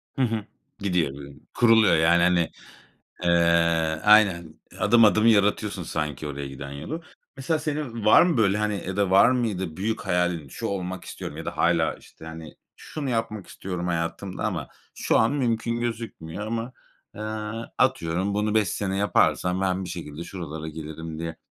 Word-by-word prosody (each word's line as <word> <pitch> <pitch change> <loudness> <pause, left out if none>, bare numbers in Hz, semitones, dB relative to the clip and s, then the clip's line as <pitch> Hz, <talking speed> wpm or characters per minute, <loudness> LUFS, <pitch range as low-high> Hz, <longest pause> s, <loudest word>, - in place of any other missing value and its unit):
Hı - - -1
hı. 115 -4 0 0.3
Gidiyor 90 -8 0
böyl 70 0 -10 0.2
kuruluyor, 115 -3 +5
yani, 85 +2 +4
hani, 90 -2 +3 0.7
eee 85 -2 +3
Aynen, 105 -5 +6 0.3
eee, - - -14
adım 120 -1 +5
adım 110 +1 +4
yaratıyorsun 105 -2 +2
sanki 75 -2 -3
oraya 70 -1 -5
giden 70 +1 -8
yolu. 150 - -6 0.3
Mesela 135 +4 -1
senin 145 -7 -4
var 110 - +7
mı 175 -2 +2
böyle, 105 -3 +3
hani, 105 -3 -1
ya 95 0 -4
da 100 -2 +1
var 95 +5 +6
mıydı 100 -10 -1
büyük 110 +3 -2
hayalin, 90 -6 -1
"Şu - - -5
olmak 95 -2 -4
istiyorum." - - -7
ya - - -6
da - - -5
hâlâ, - - +2
işte, - - -16
hani, 80 -1 -9 0.2
"Şunu 145 -4 -5
yapmak 115 -4 -2
istiyorum 90 -2 -5
hayatımda 85 +3 -3
ama 90 -9 -2 0.3
şu - - +1
an 110 +4 +3
mümkün 115 -4 -1
gözükmüyor 110 -6 -5
ama, 115 +2 -3 0.4
eee, - - -9 0.6
atıyorum 90 +5 +1
bunu 105 +1 0
5 110 -3 +3
sene 95 +1 -2
yaparsam 95 -2 +2
ben 95 0 0
bir - - -7
şekilde 85 -2 -7
şuralara 80 -4 -6
gelirim." 80 +1 -7
diye 80 0 -5
95 Hz, 165 wpm, -25 LUFS, 85-110 Hz, 0.7 s, var